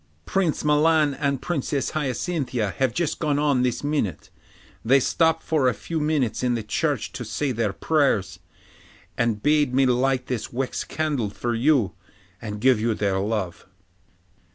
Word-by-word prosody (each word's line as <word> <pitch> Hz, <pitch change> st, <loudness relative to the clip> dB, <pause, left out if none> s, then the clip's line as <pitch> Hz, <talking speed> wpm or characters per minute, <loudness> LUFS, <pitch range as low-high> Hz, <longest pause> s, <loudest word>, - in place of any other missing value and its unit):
'Prince 175 Hz, -, 0 dB
Milan 150 Hz, 0 st, +3 dB
and 140 Hz, -1 st, -2 dB
Princess 140 Hz, -4 st, -1 dB
Hyacinthia 135 Hz, -, -2 dB
have 130 Hz, -2 st, +2 dB
just 165 Hz, +4 st, -2 dB
gone 150 Hz, -3 st, 0 dB
on 145 Hz, -3 st, +2 dB
this 125 Hz, +1 st, -1 dB
minute; 145 Hz, -, -2 dB, 0.5 s
they 135 Hz, +4 st, +5 dB
stopped 160 Hz, +4 st, +1 dB
for 155 Hz, -5 st, +1 dB
a 125 Hz, -, +2 dB
few 165 Hz, +9 st, -4 dB
minutes 150 Hz, -7 st, 0 dB
in 125 Hz, -1 st, +1 dB
the 115 Hz, -, -3 dB
church 105 Hz, -, -1 dB
to -, -, -6 dB
say 145 Hz, -2 st, -2 dB
their 115 Hz, -4 st, 0 dB
prayers, 110 Hz, -8 st, 0 dB, 0.8 s
and 115 Hz, -3 st, 0 dB
bade 145 Hz, -4 st, +2 dB
me 135 Hz, 0 st, +4 dB
light 125 Hz, +1 st, +1 dB
this 125 Hz, -4 st, -4 dB
wax 130 Hz, +1 st, -2 dB
candle 145 Hz, -9 st, -2 dB
for 120 Hz, +4 st, -3 dB
you, 120 Hz, -, +2 dB, 0.5 s
and 105 Hz, -2 st, -6 dB
give 125 Hz, -3 st, +4 dB
you 115 Hz, -1 st, +1 dB
their 100 Hz, -2 st, 0 dB
love. 95 Hz, -5 st, -3 dB
130 Hz, 155 wpm, -24 LUFS, 115-150 Hz, 0.8 s, they